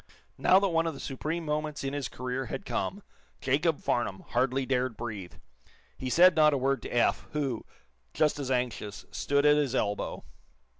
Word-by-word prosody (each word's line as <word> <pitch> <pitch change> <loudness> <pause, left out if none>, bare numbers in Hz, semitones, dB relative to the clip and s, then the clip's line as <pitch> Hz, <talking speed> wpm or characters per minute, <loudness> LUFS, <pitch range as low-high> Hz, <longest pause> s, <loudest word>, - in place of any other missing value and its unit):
Now 185 - +6
that 200 0 +1
one 165 -1 +1
of 160 - -3
the - - -9
supreme 155 +5 -3
moments 150 -1 -2
in 135 0 -2
his 145 -3 -2
career 125 +1 -4
had 195 - -5
come, 200 +1 -3 0.4
Jacob 150 +4 +1
Farnum 115 -6 -1
hardly 130 +2 +1
dared 125 -3 0
breathe. 105 -7 -6 0.6
He 130 - -4
said 180 +5 +6
not 150 -2 +5
a - - +1
word 135 +1 +1
to - - -7
Eph, 120 - +1
who, 140 -6 -2 0.4
just 150 -1 +1
as 135 -2 -3
anxious, 125 -5 -2
stood 140 +1 +1
at 150 0 +6
his 140 -3 +1
elbow. 105 -4 -1
135 Hz, 180 wpm, -29 LUFS, 125-150 Hz, 0.6 s, Now